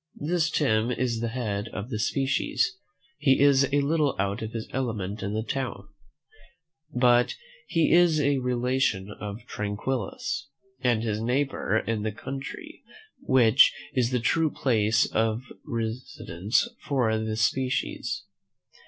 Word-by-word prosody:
This 165 Hz, +2 st, 0 dB
Tim 115 Hz, -7 st, +1 dB
is 120 Hz, -2 st, -1 dB
the 115 Hz, -, -1 dB
head 110 Hz, -4 st, -3 dB
of 110 Hz, +3 st, -6 dB
a 105 Hz, -, -2 dB
species: 135 Hz, -, 0 dB, 0.4 s
he 135 Hz, -3 st, +4 dB
is 140 Hz, -1 st, +5 dB
a 145 Hz, 0 st, +3 dB
little 145 Hz, -1 st, +1 dB
out 100 Hz, +1 st, -1 dB
of 110 Hz, 0 st, -4 dB
his 115 Hz, -1 st, -5 dB
element 110 Hz, -6 st, -3 dB
in 100 Hz, +2 st, -3 dB
this 110 Hz, +1 st, -2 dB
town; 115 Hz, -8 st, -4 dB, 1.0 s
but 125 Hz, -1 st, +3 dB, 0.3 s
he 165 Hz, -2 st, +2 dB
is 170 Hz, -2 st, +5 dB
a 140 Hz, -1 st, +2 dB
relation 125 Hz, -5 st, 0 dB
of 105 Hz, +3 st, -7 dB
Tranquillus, 105 Hz, +7 st, -3 dB, 0.3 s
and 120 Hz, -3 st, +1 dB
his 110 Hz, -2 st, -1 dB
neighbour 125 Hz, -2 st, 0 dB
in 110 Hz, -1 st, -1 dB
the 110 Hz, +1 st, -1 dB
country, 135 Hz, +5 st, -7 dB, 0.4 s
which 125 Hz, -1 st, +5 dB, 0.2 s
is 125 Hz, -3 st, +2 dB
the 125 Hz, -1 st, 0 dB
true 160 Hz, +7 st, +2 dB
place 110 Hz, -6 st, +2 dB
of 110 Hz, +2 st, 0 dB, 0.2 s
residence 110 Hz, -4 st, -1 dB
for 125 Hz, -6 st, +1 dB
this 110 Hz, 0 st, -1 dB
species. 130 Hz, +2 st, -1 dB
120 Hz, 135 wpm, -27 LUFS, 110-135 Hz, 1.0 s, is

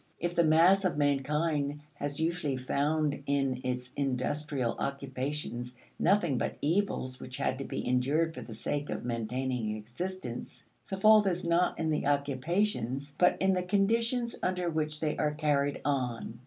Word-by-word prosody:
If 175 Hz, +1 st, -1 dB
the 170 Hz, -, +4 dB
mass 170 Hz, +5 st, +5 dB
of 175 Hz, -6 st, 0 dB
mankind 145 Hz, +1 st, +1 dB
has 145 Hz, 0 st, -4 dB
usually 160 Hz, -4 st, 0 dB
found 145 Hz, +3 st, 0 dB
in 135 Hz, -2 st, +1 dB
its 125 Hz, 0 st, -3 dB
industrial 135 Hz, -1 st, -1 dB
occupations 135 Hz, -2 st, -3 dB, 0.2 s
nothing 175 Hz, -8 st, +3 dB
but -, -, -2 dB
evils 150 Hz, -6 st, 0 dB
which 125 Hz, 0 st, -7 dB
had 130 Hz, -, -1 dB
to 135 Hz, -, -4 dB
be -, -, -4 dB
endured 140 Hz, +6 st, +2 dB
for -, -, -7 dB
the -, -, -10 dB
sake 145 Hz, +5 st, -2 dB
of -, -, -4 dB
maintaining 120 Hz, -1 st, -2 dB
existence, 125 Hz, -, -6 dB, 0.2 s
the 195 Hz, -, -2 dB
fault 215 Hz, +1 st, +6 dB
is 180 Hz, -1 st, 0 dB
not 170 Hz, +1 st, +2 dB
in 160 Hz, -1 st, 0 dB
the 150 Hz, -2 st, 0 dB
occupations, 140 Hz, -, 0 dB
but 180 Hz, -, +4 dB
in 190 Hz, 0 st, +3 dB
the 180 Hz, -, +1 dB
conditions 230 Hz, +6 st, +1 dB
under 180 Hz, -2 st, 0 dB
which 155 Hz, -1 st, -2 dB
they 155 Hz, -2 st, 0 dB
are 150 Hz, -1 st, 0 dB
carried 145 Hz, -2 st, +1 dB
on. 125 Hz, -5 st, -2 dB
145 Hz, 155 wpm, -30 LUFS, 130-170 Hz, 0.2 s, fault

